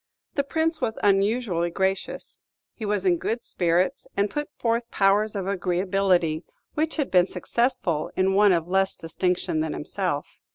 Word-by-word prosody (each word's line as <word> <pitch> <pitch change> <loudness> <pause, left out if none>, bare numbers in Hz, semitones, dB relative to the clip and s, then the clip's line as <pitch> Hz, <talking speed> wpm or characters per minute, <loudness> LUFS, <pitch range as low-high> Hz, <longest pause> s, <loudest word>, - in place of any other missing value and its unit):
The 280 - +1
Prince 320 +2 -1
was 220 -3 -1
unusually 200 -3 +2
gracious. 190 +2 -2 0.3
He 220 - -6
was 205 -2 0
in 175 -2 +4
good 230 +2 -2
spirits, 175 +1 0
and 200 +1 +1
put 295 0 -3
forth 230 0 0
powers 205 +2 +2
of 195 -2 -2
agreeability 180 -3 +1 0.3
which 315 +1 -1
had 290 -4 -1
been 180 -1 +5
successful 185 - -1
in 190 +1 +2
one 205 +1 +5
of 170 -2 +1
less 190 +1 +1
distinction 180 0 -1
than 155 -1 -1
himself. 170 -2 -3
195 Hz, 155 wpm, -25 LUFS, 180-220 Hz, 0.3 s, been